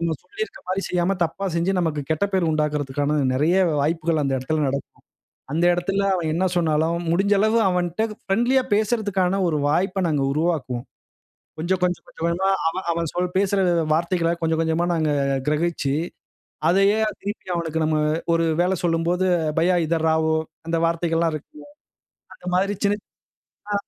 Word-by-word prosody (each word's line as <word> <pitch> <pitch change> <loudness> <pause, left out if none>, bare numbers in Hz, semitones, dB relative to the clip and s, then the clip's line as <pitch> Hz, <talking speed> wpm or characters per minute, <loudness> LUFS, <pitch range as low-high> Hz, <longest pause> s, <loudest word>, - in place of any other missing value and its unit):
நம்ம 170 -1 0
சொல்லியிருக்ற 440 +2 -6
மாரி 190 +1 -1
செய்யாம 180 +2 +1
தப்பா 165 +4 -4
செஞ்சு, 170 +3 +1
நமக்கு 160 -4 -1
கெட்ட 160 +5 +1
பெயர் 180 -4 +2
உண்டாக்குறதுக்கான 150 -1 0 0.2
நெறைய 155 +7 +2 0.2
வாய்ப்புகள் 160 +2 0
அந்த 135 -1 0
எடத்துல 150 +4 -1
நடக்கும். 140 +1 -4 0.6
அந்த 165 +4 +1
எடத்துல 195 +3 -1
அவன் 170 -4 -1
என்ன 180 +4 +1
சொன்னாலும், 160 0 +1
முடிஞ்ச 195 +4 +2
அளவு 220 +2 +3
அவன்கிட்ட 180 +2 0 0.2
பிரெண்ட்லியா 240 +6 +2
பேசுறதுக்கான 205 -4 +1
ஒரு 160 -3 0
வாய்ப்ப 185 +5 +1
நாங்க 150 -4 +1
உருவாக்குவோம். 145 -6 -1 0.7
கொஞ்சம், 175 +3 0
கொஞ்சம், 180 -1 0
கொஞ்சம், 165 - -6
கொஞ்சமா 180 +3 +1 0.4
அவன் 170 0 -1 0.3
பேசுற 200 0 +2 0.3
வார்த்தைகள 170 +1 +1
கொஞ்சம், 160 0 0
கொஞ்சமா 160 +1 +1
நாங்க 155 -3 +1 0.4
கிரகிச்சு, 150 -2 0 0.8
அதையே 195 +3 +3 0.2
திருப்பி 205 -1 -6
அவனுக்கு 160 -2 -2
நம்ம 155 0 +1 0.4
ஒரு 165 0 +2 0.2
வேலை 185 +1 +1
சொல்லும்போது, 170 +2 +1 0.3
பையா 180 +2 +3
இதர 165 0 0
ராவோ 160 0 +2 0.3
அந்த 165 - 0
வார்த்தைகள்லாம் 165 0 0
இருக்குங்க. 295 - -9 0.7
அந்த 180 - -13
மாதிரி 195 +3 +1
சின்ன, 205 +1 +2 0.7
ஆ - - 0
170 Hz, 145 wpm, -23 LUFS, 160-190 Hz, 0.8 s, அளவு